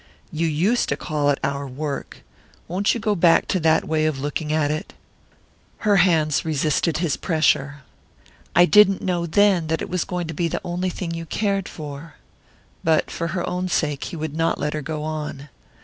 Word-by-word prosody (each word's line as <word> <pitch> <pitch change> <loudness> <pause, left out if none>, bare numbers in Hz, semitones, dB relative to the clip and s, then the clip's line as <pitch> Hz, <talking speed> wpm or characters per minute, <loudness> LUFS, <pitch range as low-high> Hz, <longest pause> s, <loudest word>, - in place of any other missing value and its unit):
"You 165 +1 0
used 180 +11 +1
to 140 - 0
call 150 -2 -1
it 140 - +2
our 140 0 -2
work 140 +2 -5 0.4
won't 195 +6 +1
you - - -2
go 210 -1 +1
back 170 -3 +4
to 185 - +1
that 160 -1 +3
way 155 0 +1
of 150 -3 -2
looking 150 +2 -3
at 155 -1 +1
it?" 155 +6 -5 0.8
Her 205 -2 +2
hands 160 -5 +3
resisted 155 0 0
his 165 -3 0
pressure. 145 -3 +1 0.7
"I 175 - +7
didn't 195 0 +5
know, 175 -2 -1
then, 190 -2 +3
that 160 +1 0
it - - -6
was 180 -2 0
going 180 -2 -3
to 165 - -5
be 170 +3 0
the - - -3
only 180 +1 -2
thing 175 -1 -4
you 165 0 -6
cared 195 +1 -1
for 150 0 -8 0.3
" - - -34
But 160 -1 +2
for 165 - -3
her 175 +1 -3
own 180 +1 -2
sake 150 -5 -1
he 180 - -6
would 155 -2 -4
not 165 0 +1
let 150 +1 -1
her 155 - -3
go 150 +1 -4
on. 150 -2 -5
160 Hz, 195 wpm, -22 LUFS, 150-180 Hz, 0.8 s, I